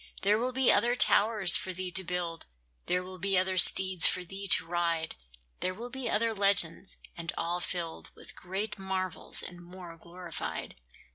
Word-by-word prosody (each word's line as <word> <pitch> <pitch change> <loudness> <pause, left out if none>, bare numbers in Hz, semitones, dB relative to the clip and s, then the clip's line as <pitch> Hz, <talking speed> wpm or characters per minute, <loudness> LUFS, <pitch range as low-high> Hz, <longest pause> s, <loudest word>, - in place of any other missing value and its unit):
There 205 +2 +3
will 250 +2 -1
be 260 0 +3
other 235 +4 +2
towers 210 -6 +4
for 185 - +1
thee 185 0 -5
to 190 +1 -1
build; 175 -2 -5 0.4
There 180 0 0
will 185 0 -10
be 195 0 0
other 185 0 +1
steeds 185 -1 +6
for 180 - 0
thee 195 +3 -8
to 175 - +4
ride; 170 -1 -2 0.5
There 185 - -2
will 240 +4 -8
be 265 -3 -5
other 225 +1 0
legends, 195 -3 +1 0.2
and 165 -1 -4
all 170 +1 -2
filled 170 -2 -5
With - - -13
greater 195 +3 -5
marvels 190 -1 -4
and 175 -1 -10
more 175 -1 -11
glorified. 170 0 -7
185 Hz, 170 wpm, -29 LUFS, 175-200 Hz, 0.5 s, steeds